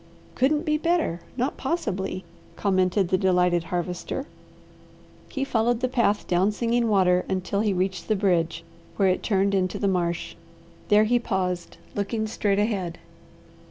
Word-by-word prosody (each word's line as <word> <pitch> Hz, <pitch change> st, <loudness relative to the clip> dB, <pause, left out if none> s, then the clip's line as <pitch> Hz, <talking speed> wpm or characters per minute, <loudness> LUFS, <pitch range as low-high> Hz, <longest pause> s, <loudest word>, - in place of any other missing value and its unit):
"Couldn't 295 Hz, +5 st, +1 dB
be 305 Hz, -1 st, +1 dB
better, 330 Hz, -, +1 dB, 0.2 s
not 255 Hz, +3 st, -1 dB
possibly!" 195 Hz, -, -2 dB, 0.3 s
commented 185 Hz, -1 st, +1 dB
the 185 Hz, -, +2 dB
delighted 180 Hz, -2 st, +2 dB
Harvester. 180 Hz, +9 st, -3 dB, 1.0 s
He 270 Hz, -, -2 dB
followed 240 Hz, -3 st, +1 dB
the 255 Hz, -, +1 dB
path 235 Hz, -5 st, +1 dB
down 185 Hz, +4 st, +2 dB
Singing 235 Hz, +2 st, 0 dB
Water 180 Hz, -3 st, +3 dB
until 190 Hz, +1 st, -1 dB
he 210 Hz, -1 st, +2 dB
reached 190 Hz, +1 st, -1 dB
the 215 Hz, -, +2 dB
bridge 170 Hz, -4 st, +1 dB, 0.3 s
where 195 Hz, -2 st, +3 dB
it 185 Hz, -, +1 dB
turned 200 Hz, -1 st, +1 dB
into 185 Hz, -2 st, 0 dB
the 200 Hz, -, 0 dB
marsh. 175 Hz, -3 st, -1 dB, 0.5 s
There 210 Hz, +1 st, +5 dB
he 240 Hz, +3 st, +3 dB
paused, 180 Hz, -6 st, -2 dB, 0.2 s
looking 215 Hz, +2 st, -1 dB
straight 205 Hz, -2 st, 0 dB
ahead. 195 Hz, -5 st, -1 dB
195 Hz, 145 wpm, -25 LUFS, 180-230 Hz, 1.0 s, There